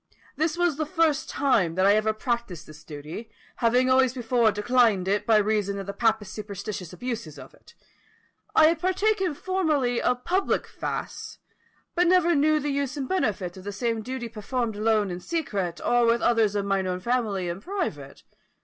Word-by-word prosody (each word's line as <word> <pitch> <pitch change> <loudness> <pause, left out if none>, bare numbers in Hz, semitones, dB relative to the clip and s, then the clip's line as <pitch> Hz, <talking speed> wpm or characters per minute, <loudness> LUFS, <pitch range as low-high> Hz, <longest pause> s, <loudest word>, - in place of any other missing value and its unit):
This 315 +2 0
was 350 -4 +1
the 310 - -1
first 320 -3 +1
time 200 -12 +1
that 185 +1 +2
I 200 - +6
ever 215 +1 +2
practised 225 - -3
this 155 -1 -14
duty, 155 +9 -8 0.3
having 245 +2 +3
always 260 -1 +3
before 240 -2 +2
declined 210 -2 +2
it, 205 +2 0
by 225 -1 +5
reason 210 -1 0
of 195 - -5
the 200 - -5
papists' 220 -2 0
superstitious 200 -4 -6
abuses 215 - -5
of - - -12
it. - - -20 0.8
I 315 - +7
had 330 -1 0
partaken 375 -1 +1
formerly 305 -10 0
of 250 0 0
public 380 +3 0
fasts, - - -6 0.6
but 355 0 +2
never 350 -1 +4
knew 305 +1 +3
the 290 -1 -2
use 280 +1 -2
and 270 -2 -3
benefit 195 - -1
of 185 - -10
the 205 - -5
same 225 +2 -2
duty 255 +1 -5
performed 230 +1 -3
alone 215 -2 +1
in 175 - -5
secret, 195 - -3
or 240 -1 +3
with 235 +1 +2
others 225 -4 +3
of 200 -1 0
mine 195 -1 0
own 180 0 -2
family 210 -4 -1
in 175 +3 -4
private. 205 - -5
230 Hz, 180 wpm, -26 LUFS, 200-280 Hz, 0.8 s, I